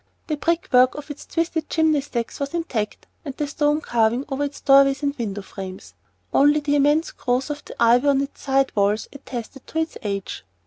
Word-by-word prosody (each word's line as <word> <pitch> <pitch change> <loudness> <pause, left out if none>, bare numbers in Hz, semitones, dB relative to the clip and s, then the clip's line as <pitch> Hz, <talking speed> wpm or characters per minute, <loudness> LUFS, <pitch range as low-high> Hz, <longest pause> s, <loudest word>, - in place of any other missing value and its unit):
The 310 - -1
brick 335 +3 0
work 250 +1 +6
of 295 0 -7
its 290 - -10
twisted 330 -2 -2
chimney 315 -3 +2
stacks 235 -4 -4
was 280 +3 -3
intact, 240 -11 -3 0.2
and 280 -4 -7
the 295 - -1
stone 295 +1 +1
carving 235 +2 +1
over 280 +1 -1
its 285 0 -7
doorways 275 0 +5
and 285 0 0
window 205 -5 -4
frames; 190 -1 -9 0.4
only 290 +2 +5
the 290 -1 0
immense 295 +3 +3
growth 255 +4 -1
of 295 0 -6
the - - -10
ivy 240 +4 +4
on 275 -1 +4
its 280 - -6
side 270 -1 +1
walls 205 +1 +1
attested 265 -1 -8
to - - -6
its 320 0 -2
age. 200 -2 -4
275 Hz, 195 wpm, -23 LUFS, 240-295 Hz, 0.4 s, work